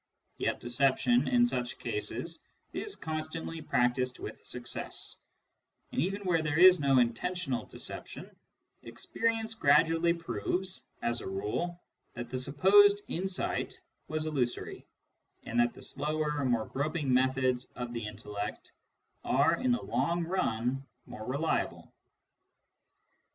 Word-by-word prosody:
Yet -, -, 0 dB
deception 135 Hz, -, +2 dB
in 245 Hz, -1 st, +5 dB
such 125 Hz, -, -2 dB
cases 415 Hz, -1 st, -4 dB, 0.3 s
is 415 Hz, -, -4 dB
constantly 160 Hz, +1 st, -4 dB
practised 125 Hz, -2 st, +1 dB
with -, -, -8 dB
success; 120 Hz, -1 st, -5 dB, 0.7 s
and -, -, 0 dB
even 195 Hz, +5 st, -1 dB
where 175 Hz, -4 st, +2 dB
there 150 Hz, -1 st, -1 dB
is 185 Hz, +1 st, +9 dB
no 140 Hz, -2 st, +4 dB
intentional 130 Hz, +4 st, 0 dB
deception, -, -, -7 dB, 0.5 s
experience 225 Hz, -, -2 dB
gradually 165 Hz, -2 st, +4 dB
proves, 175 Hz, -, -3 dB, 0.2 s
as 120 Hz, 0 st, 0 dB
a -, -, -5 dB
rule, 105 Hz, -, -3 dB, 0.3 s
that 120 Hz, 0 st, -6 dB
the 130 Hz, -, -1 dB
supposed 200 Hz, +10 st, +5 dB
insight 190 Hz, -, -1 dB, 0.3 s
was 155 Hz, 0 st, -2 dB
illusory, 135 Hz, -6 st, -2 dB, 0.6 s
and 120 Hz, -, -1 dB
that 120 Hz, 0 st, +3 dB
the -, -, -11 dB
slower, 150 Hz, -1 st, -1 dB
more 120 Hz, -3 st, +2 dB
groping 145 Hz, -1 st, -1 dB
methods 130 Hz, -1 st, +2 dB
of 120 Hz, -1 st, -5 dB
the 115 Hz, -3 st, -3 dB
intellect 105 Hz, 0 st, -6 dB, 0.5 s
are 145 Hz, +5 st, +3 dB
in 255 Hz, -1 st, +1 dB
the 245 Hz, -, +1 dB
long 170 Hz, 0 st, 0 dB
run 135 Hz, -7 st, 0 dB, 0.2 s
more 110 Hz, -, -8 dB
reliable. 140 Hz, +5 st, -1 dB
145 Hz, 120 wpm, -31 LUFS, 125-175 Hz, 0.7 s, is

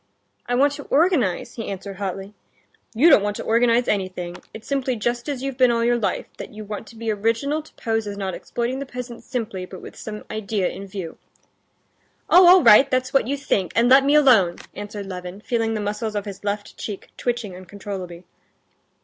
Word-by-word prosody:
I 245 Hz, -, 0 dB
want 280 Hz, +3 st, +3 dB
to 285 Hz, -, -7 dB
organize...." 285 Hz, -, +1 dB
he 225 Hz, -, -4 dB
answered 195 Hz, 0 st, -6 dB
hotly. 195 Hz, 0 st, -5 dB, 0.6 s
"You 275 Hz, +9 st, +5 dB
don't 245 Hz, -, +7 dB
want 205 Hz, 0 st, -2 dB
to -, -, -5 dB
organize 235 Hz, +1 st, +3 dB
anything; 185 Hz, -3 st, -2 dB
it's 220 Hz, -, -11 dB
simply 270 Hz, -2 st, 0 dB
just 240 Hz, +4 st, -2 dB
as 270 Hz, -3 st, -3 dB
you've 270 Hz, -1 st, -4 dB
been 255 Hz, -1 st, +6 dB
all 230 Hz, -1 st, +1 dB
your 240 Hz, 0 st, +2 dB
life, 215 Hz, -, -1 dB
that -, -, -7 dB
you 215 Hz, 0 st, -9 dB
want 210 Hz, +1 st, -6 dB
to 230 Hz, -, -14 dB
be 225 Hz, 0 st, -2 dB
original 230 Hz, +9 st, 0 dB
to 310 Hz, -, -19 dB
pose 225 Hz, -2 st, -1 dB
as 200 Hz, 0 st, -5 dB
not 190 Hz, -2 st, -3 dB
exploiting 240 Hz, +7 st, -3 dB
the 275 Hz, -, -5 dB
peasants 245 Hz, -2 st, -8 dB
simply, 220 Hz, -8 st, -4 dB
but 185 Hz, -, -9 dB
with -, -, -11 dB
some 210 Hz, -1 st, -7 dB
idea 210 Hz, -3 st, -1 dB
in 195 Hz, -, -8 dB
view." 185 Hz, -4 st, -7 dB, 1.1 s
"Oh, 360 Hz, 0 st, +8 dB
all 365 Hz, 0 st, +8 dB
right, 265 Hz, +6 st, +8 dB
that's 255 Hz, 0 st, 0 dB
what 270 Hz, -4 st, +3 dB
you 280 Hz, +2 st, -1 dB
think—and 230 Hz, -, +1 dB
let 270 Hz, +1 st, +7 dB
me 285 Hz, +2 st, +3 dB
alone!" 230 Hz, -12 st, +5 dB, 0.2 s
answered 205 Hz, 0 st, -7 dB
Levin, 180 Hz, +1 st, -7 dB
feeling 225 Hz, -1 st, -1 dB
the -, -, -2 dB
muscles 210 Hz, +1 st, -3 dB
of 205 Hz, 0 st, -2 dB
his 200 Hz, -1 st, -8 dB
left 205 Hz, 0 st, -4 dB
cheek 205 Hz, -3 st, -6 dB
twitching 235 Hz, -6 st, -3 dB
uncontrollably. 185 Hz, -2 st, -8 dB
220 Hz, 200 wpm, -23 LUFS, 200-250 Hz, 1.1 s, Oh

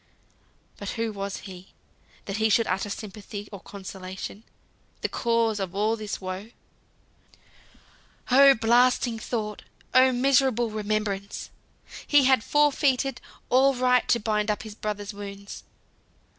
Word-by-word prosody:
But 200 Hz, -, -6 dB
who 225 Hz, -1 st, -1 dB
was 200 Hz, -1 st, -5 dB
he, 185 Hz, -1 st, -11 dB, 0.5 s
that 195 Hz, +1 st, -4 dB
he 220 Hz, 0 st, +2 dB
should 230 Hz, +2 st, +3 dB
utter 195 Hz, +2 st, -1 dB
sympathy 205 Hz, 0 st, -7 dB
or 200 Hz, -, -8 dB
consolation? 190 Hz, +1 st, -8 dB, 0.6 s
The -, -, -1 dB
cause 230 Hz, -2 st, +1 dB
of 190 Hz, -1 st, -4 dB
all 215 Hz, +3 st, +1 dB
this 215 Hz, -2 st, -5 dB
woe. 185 Hz, +3 st, -6 dB, 1.8 s
Oh 275 Hz, +1 st, +8 dB
blasting 240 Hz, +1 st, +3 dB
thought! 215 Hz, -2 st, -4 dB, 0.3 s
Oh 260 Hz, 0 st, +6 dB
miserable 255 Hz, -2 st, +2 dB
remembrance! 210 Hz, -2 st, -3 dB, 0.6 s
He 290 Hz, -2 st, +5 dB
had 260 Hz, -3 st, +4 dB
forfeited 275 Hz, -3 st, +2 dB, 0.3 s
all 265 Hz, +2 st, +5 dB
right 250 Hz, 0 st, +3 dB
to 235 Hz, -, +3 dB
bind 210 Hz, -1 st, 0 dB
up 210 Hz, -, -1 dB
his 215 Hz, -1 st, -8 dB
brother's 210 Hz, -1 st, -5 dB
wounds. 200 Hz, 0 st, -9 dB
215 Hz, 125 wpm, -26 LUFS, 200-245 Hz, 1.8 s, Oh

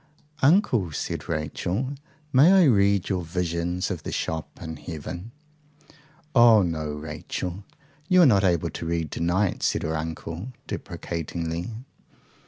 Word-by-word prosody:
"Uncle," 135 Hz, -, +3 dB
said -, -, -4 dB
Rachel, 90 Hz, -, -2 dB, 0.4 s
"may 140 Hz, +7 st, +7 dB
I 190 Hz, -1 st, +7 dB
read 100 Hz, -, +4 dB
your 95 Hz, -3 st, 0 dB
visions 85 Hz, +1 st, -2 dB
of -, -, -4 dB
the -, -, -5 dB
shops 80 Hz, -1 st, -4 dB
in 80 Hz, -1 st, -6 dB
heaven?" 85 Hz, +6 st, -7 dB, 1.0 s
"Oh 115 Hz, -4 st, +7 dB
no, 80 Hz, -3 st, -2 dB
Rachel. 80 Hz, +5 st, -5 dB, 0.5 s
You 180 Hz, -1 st, +7 dB
are -, -, +8 dB
not 105 Hz, -7 st, +5 dB
able 85 Hz, -4 st, +2 dB
to -, -, -6 dB
read 85 Hz, -3 st, -1 dB
to -, -, -5 dB
night," 90 Hz, +3 st, +1 dB
said -, -, +1 dB
her 80 Hz, +1 st, -1 dB
uncle 80 Hz, +7 st, -5 dB
deprecatingly. 85 Hz, +2 st, -4 dB
85 Hz, 135 wpm, -25 LUFS, 80-105 Hz, 1.0 s, are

